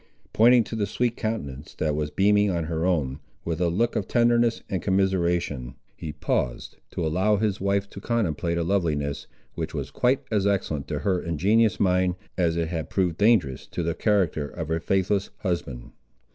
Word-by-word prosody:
Pointing 120 +2 +6
to 115 - -6
the 105 -2 0
sweet 120 +3 0
countenance 75 - -4
that 75 -2 0
was 75 -1 -1
beaming 105 +3 +3
on 85 -3 0
her 80 +2 -1
own, 70 -7 0 0.3
with 85 +1 -2
a 85 - +3
look 115 +8 0
of 95 - -1
tenderness 120 -1 +2
and 95 -4 -2
commiseration, 85 -9 0 0.2
he 80 - -6
paused, - - -2
to - - -3
allow 95 +7 +2
his 100 -2 -1
wife 100 0 +1
to 100 - -9
contemplate 85 -8 -1
a 85 - +1
loveliness, 80 -6 -1 0.3
which - - -4
was - - -4
quite 130 +3 +1
as 100 -2 +2
excellent 90 -8 -1
to - - -2
her 95 -3 +2
ingenuous 100 +7 +2
mind 90 -1 +2 0.2
as 85 -2 +1
it 85 -1 -1
had 80 -3 -4
proved 90 -4 0
dangerous 100 - +2
to 85 - -4
the 85 0 0
character 90 -9 +1
of 80 +1 -6
her 80 0 0
faithless 95 +3 0
husband. 85 - -3
90 Hz, 180 wpm, -25 LUFS, 80-105 Hz, 0.3 s, Pointing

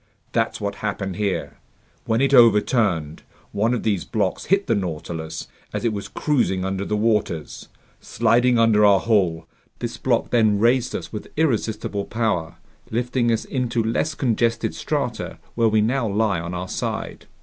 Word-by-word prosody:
That's 115 -1 0
what 100 -1 -3
happened 100 -3 -3
here. 95 -9 -2 0.5
When 115 +1 +1
it 140 0 +2
overturned, 105 - +4 0.3
one 110 +3 +1
of 125 - -1
these 100 -6 0
blocks - - -2
hit 195 +2 +2
the - - +1
Nautilus 80 -4 -4 0.3
as - - -3
it 115 - +1
was 100 -1 -5
cruising 110 -11 0
under 95 0 -2
the 105 +1 -1
waters. 105 -8 -1 0.3
Sliding 120 +1 +2
under 115 -2 +4
our 100 -2 +6
hull, 90 -8 +1 0.3
this - - -5
block - - 0
then 110 -4 +3
raised 120 +3 +2
us - - -6
with 105 - -6
irresistible 110 -8 0
power, 90 -8 -1 0.3
lifting 120 +1 0
us 115 - 0
into 120 -3 -1
less 130 +7 -1
congested 115 -2 0
strata - - -3 0.2
where 115 -1 +2
we 110 0 +3
now 120 +2 +1
lie 105 -3 +1
on 85 +2 -5
our 90 +1 -4
side." - - -4
110 Hz, 160 wpm, -22 LUFS, 95-120 Hz, 0.5 s, our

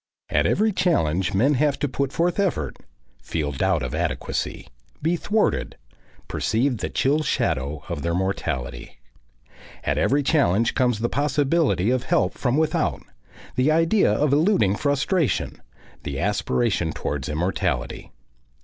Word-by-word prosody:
At - - +3
every 215 +1 +2
challenge 95 - +1
men 130 +9 +3
have 140 0 +1
to 145 - -1
put 140 +1 -2
forth 170 +6 0
effort, 150 - -1 0.4
feel 75 -3 -2
doubt 65 - 0
of - - -4
adequacy, - - -3 0.3
be 165 +3 +1
thwarted, 210 +5 0 0.5
perceive 120 +1 0
the - - -3
chill 145 +4 +1
shadow 75 - -1
of 70 - -4
their 85 +2 -1
mortality. 90 -10 -3 0.9
At - - 0
every 145 +2 +2
challenge 120 - +2
comes 125 -4 +1
the 120 - +2
possibility 140 - +1
of 130 0 0
help 95 -7 +1
from 125 +1 0
without, 160 0 0 0.5
the 130 +5 +3
idea 165 - +3
of 140 +6 +2
eluding 150 - +3
frustration, 145 - 0 0.4
the 70 -1 -4
aspiration 65 -1 0
towards 70 -1 -3
immortality. 75 -6 -2
130 Hz, 130 wpm, -23 LUFS, -, 0.9 s, At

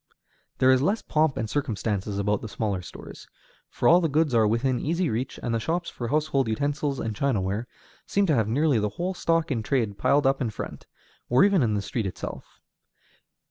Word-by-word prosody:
There 130 0 +5
is 130 0 +4
less 200 +9 0
pomp 155 -2 +1
and 110 - -2
circumstance 110 -7 -2
about 100 0 -1
the 110 - -6
smaller 100 -4 -2
stores, - - -11 0.4
for - - 0
all 175 +2 +7
the 165 - +1
goods 150 -1 +1
are 110 -2 +4
within 125 +3 +1
easy 170 0 0
reach, 125 +5 -3
and 120 - -1
the 115 - +1
shops 170 +9 -2
for 120 - -5
household 145 -2 +1
utensils 145 +4 -1
and 110 -1 -3
chinaware 110 -3 -1 0.4
seem 200 0 +2
to 160 - +2
have 110 -6 +2
nearly 140 +2 +2
the 105 0 0
whole 180 +2 -1
stock 165 -3 0
in 120 -4 0
trade 110 -3 -1
piled 145 0 +3
up 135 +1 +2
in 120 - 0
front, 110 - -7 0.4
or 125 +2 +5
even 200 -4 +4
in 110 -4 +1
the 100 - -1
street 110 -2 -2
itself. 95 - -8
130 Hz, 200 wpm, -26 LUFS, 110-155 Hz, 0.4 s, all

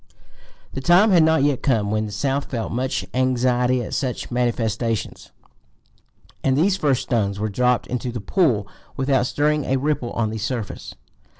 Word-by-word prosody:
The 135 - -4
time 180 +8 +5
had 175 -3 +6
not 160 -2 +3
yet 145 -3 +1
come 110 -6 +1
when 110 0 0
the - - -8
South 140 +5 -1
felt 115 -4 -3
much 130 +2 -2
anxiety 125 -1 +1
at - - -7
such 130 -3 -3
manifestations, 115 -2 -2 1.1
and 135 0 +2
these 185 +5 +3
first 145 -8 +1
stones 100 -5 -1
were 110 +1 -1
dropped 125 +4 +1
into 125 0 -3
the 120 - -5
pool 115 - +1 0.3
without 135 -2 +1
stirring 150 +2 +1
a 135 - +1
ripple 135 -3 -1
on 110 -2 -1
the 110 - -4
surface. 115 -1 -5
125 Hz, 165 wpm, -22 LUFS, 115-140 Hz, 1.1 s, had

